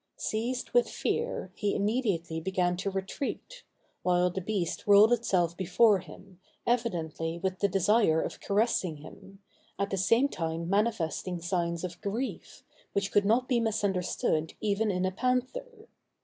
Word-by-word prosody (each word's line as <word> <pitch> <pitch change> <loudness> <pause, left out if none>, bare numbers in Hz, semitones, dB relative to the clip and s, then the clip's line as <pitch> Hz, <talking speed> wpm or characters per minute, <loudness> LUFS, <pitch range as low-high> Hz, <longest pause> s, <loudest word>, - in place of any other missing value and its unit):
Seized 240 +4 -2
with 245 0 +3
fear, 465 - -2
he 205 +2 -1
immediately 200 -7 0
began 180 0 0
to 195 +2 -2
retreat; 195 - -5 0.4
while 180 0 +2
the 190 +2 -4
beast 190 -2 -3
rolled 205 +3 +7
itself 180 -8 +1
before 200 +3 +4
him, 185 +1 -14 0.3
evidently 170 -9 -1
with 185 +1 -2
the 200 - +3
desire 195 -2 +3
of - - -4
caressing 200 -6 +1
him, 195 +6 -14 0.3
at 200 0 -2
the 195 - 0
same 230 +9 +3
time 165 -7 -3
manifesting 190 -3 0
signs 170 -1 -1
of 180 -1 -6
grief, 225 +7 -4 0.3
which 200 0 -1
could 205 -1 +3
not 240 +5 +3
be 245 -3 +2
misunderstood 190 -7 0
even 215 +1 0
in 185 -1 0
a 185 - 0
panther. 260 - -2
195 Hz, 145 wpm, -29 LUFS, 175-230 Hz, 0.4 s, rolled